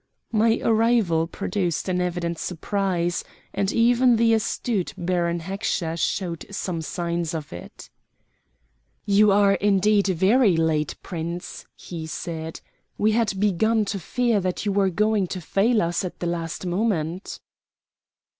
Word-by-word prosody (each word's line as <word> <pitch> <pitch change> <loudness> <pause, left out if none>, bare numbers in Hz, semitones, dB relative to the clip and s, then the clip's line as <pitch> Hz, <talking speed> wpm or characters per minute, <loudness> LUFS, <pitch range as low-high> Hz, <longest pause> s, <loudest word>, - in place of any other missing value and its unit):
My 225 +1 +3
arrival 220 -8 +2
produced 180 -1 -2
an 180 -1 0
evident 170 -2 -2
surprise, 180 -1 -1 0.3
and 195 0 0
even 240 +1 +4
the 230 0 +3
astute 220 -2 -1
Baron 175 -1 0
Heckscher 175 -2 -2
showed 170 0 -2
some 185 -4 -3
signs 170 0 -3
of 150 - -6
it. 85 - -11 1.1
"You 205 0 +5
are 200 0 +5
indeed 200 0 +3
very 195 +2 +3
late, 160 -2 +1
Prince," 170 0 -6
he 165 -3 -7
said. 160 0 -5 0.4
"We 215 +1 +3
had 215 -3 0
begun 210 +2 +2
to 200 - -3
fear 235 +3 +1
that 185 +2 -2
you 205 - +1
were 195 -1 +2
going 210 +1 +1
to 185 - -5
fail 210 +6 +2
us 170 +2 -1
at 180 - -6
the - - -3
last 170 0 -3
moment." 180 -2 -2
190 Hz, 135 wpm, -24 LUFS, 170-210 Hz, 1.1 s, You